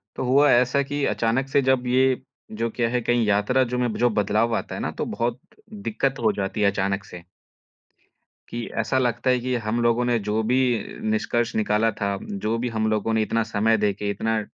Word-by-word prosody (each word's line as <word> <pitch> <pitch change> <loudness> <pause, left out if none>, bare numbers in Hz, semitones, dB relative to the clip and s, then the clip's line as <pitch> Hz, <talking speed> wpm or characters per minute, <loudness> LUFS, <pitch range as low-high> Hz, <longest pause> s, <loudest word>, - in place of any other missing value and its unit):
तो - - -3
हुआ 140 +3 +4
ऐसा 125 +3 +3
की 145 +1 -3
अचानक 120 +4 0
से 140 - +3
जब 130 -1 +1
ये, 130 +1 +2 0.3
जो 115 +2 -2
क्या 115 0 -1
है 125 +1 0
कहीं 120 0 +1
यात्रा 105 +6 +2
जो - - 0
में 125 -2 0
जो 120 - +3
बदलाव 110 +2 +1
आता - - -5
है - - -5
ना - - -2
तो - - -4
बहुत 120 +1 -2 0.5
दिक्कत 135 -10 -1
हो 110 - +4
जाती 100 +2 -3
है 100 - +4
अचानक 95 0 -1
से 90 -1 -10 1.3
कि 120 0 -4 0.2
ऐसा 130 +4 -1
लगता 120 0 0
है 125 0 +3
कि 125 +1 -2
हम 110 +3 -1
लोगों 120 +1 +2
ने 120 -1 +2
जो 105 +1 +1
भी 130 - +3 0.5
निष्कर्ष 115 +2 0
निकाला 110 +1 +2
था, 100 -1 -2
जो 110 +3 -3
भी 120 +2 -2
हम 110 0 +1
लोगों 110 +1 0
ने 110 - +2
इतना 115 +1 0
समय 110 0 +1
देके 105 -1 -1
इतना 110 +1 -1
115 Hz, 205 wpm, -24 LUFS, 110-125 Hz, 1.3 s, हुआ